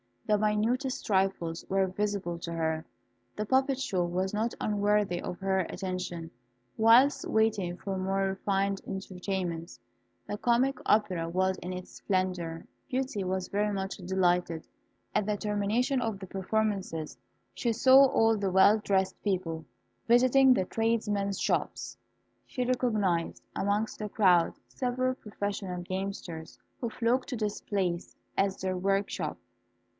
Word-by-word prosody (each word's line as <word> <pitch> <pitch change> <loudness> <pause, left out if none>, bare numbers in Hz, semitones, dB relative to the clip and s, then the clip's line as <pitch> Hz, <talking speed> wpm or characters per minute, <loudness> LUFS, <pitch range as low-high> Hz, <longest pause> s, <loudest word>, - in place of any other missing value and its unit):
The 210 - +3
minutest 225 +6 0
trifles 190 -4 0
were 195 0 +3
visible 190 -3 -2
to 170 0 -5
her. 160 -1 -1 0.5
The 210 - -2
puppet 265 +3 +2
show 190 -9 0
was 185 +3 -1
not 225 +3 -1
unworthy 205 -3 +1
of 180 - -5
her 190 0 +1
attention, 185 -2 -4 0.5
whilst 235 +6 +5
waiting 210 -5 +1
for 195 -1 -4
more 195 +1 0
refined 195 0 0
entertainments. 185 -3 -4 0.5
The 205 - -3
comic 250 +4 +2
opera 185 -6 +2
was 185 +2 +1
in 180 +1 -5
its 180 0 -7
splendour. 180 -4 -2 0.2
Beauty 255 -7 -2
was 185 0 -2
very 210 +1 0
much 195 0 -3
delighted. 180 -3 0 0.5
At 210 - +1
the 210 - +1
termination 215 +6 0
of 225 -4 -2
the 190 -1 -9
performances, 195 -5 -2 0.4
she 235 -2 0
saw 260 +4 +7
all 225 -4 +3
the 200 -2 0
well 190 +3 +6
dressed 190 -2 0
people 175 -5 -1 0.4
visiting 255 +2 +6
the 190 - +1
tradesmen's 210 -3 0
shops. - - -1 0.5
She 250 -2 -2
recognised 215 -9 0
amongst 205 +2 0
the 210 -1 -3
crowd 180 -5 +4 0.2
several 255 0 -1
professional 200 -5 -4
gamesters, 185 -3 -5 0.2
who 235 - -2
flocked 245 +3 0
to 260 - -2
this 210 -2 -2
place 180 -4 -2 0.2
as 195 -1 +1
their 185 -1 -1
workshop. 195 +2 -1
195 Hz, 135 wpm, -29 LUFS, 185-220 Hz, 0.5 s, saw